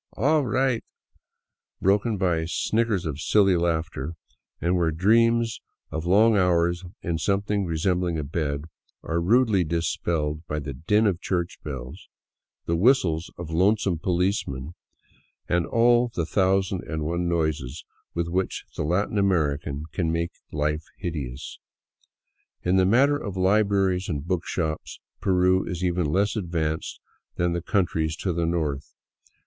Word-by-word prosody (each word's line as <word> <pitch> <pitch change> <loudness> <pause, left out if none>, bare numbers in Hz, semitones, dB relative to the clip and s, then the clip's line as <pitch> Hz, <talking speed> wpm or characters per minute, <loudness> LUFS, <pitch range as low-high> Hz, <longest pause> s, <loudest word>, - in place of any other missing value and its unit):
Awe 155 +6 +3
right," 130 -1 +1 1.0
broken 100 +3 +2
by 85 -4 +1
snickers 110 +2 0
of 75 -2 -3
silly 100 -1 +4
laughter; 85 -3 -1 0.4
and 90 +2 +1
where 85 -2 +2
dreams 115 +7 +2 0.3
of 80 +2 -3
long 110 +5 +5
hours 85 -2 +2 0.2
in 85 -2 -1
something 100 +2 0
resembling 85 +1 0
a 75 - -2
bed 70 -1 -2 0.4
are 85 +1 -1
rudely 110 0 +3
dispelled 80 -1 -1
by 75 - -2
the 70 -2 -4
din 105 - +2
of 95 -4 +1
church 90 -1 -2
bells, 65 -5 -7 0.6
the 85 - 0
whistles 90 -6 +3
of 85 -2 -7
lonesome 95 0 +2
policemen, 85 -6 -1 0.7
and 90 -1 +1
all 120 +1 +4
the 85 - 0
thousand 95 0 +1
and 80 -2 -3
one 85 +2 -1
noises 80 -4 -2 0.3
with 85 0 -1
which 90 +2 -2
the - - -2
Latin 100 +6 0
American 75 -6 0
can 80 -1 -1
make 85 +1 -1 0.2
life 75 +1 -1
hideous. 70 -8 -5 1.0
In 90 +2 +2
the 95 -1 +4
matter 140 +7 +4
of 100 -7 -5
libraries 95 -1 +2
and 75 -3 -3
book 90 -1 -2
shops 80 -3 -3 0.2
Peru 95 0 +3
is 90 0 -4
even 90 -2 +1
less 100 +7 +1
advanced 80 -5 -2 0.4
than 85 0 0
the 85 - -2
countries 80 -5 0
to 90 +1 -2
the 85 0 0
north. 75 -5 -2
85 Hz, 140 wpm, -25 LUFS, 80-100 Hz, 1.0 s, long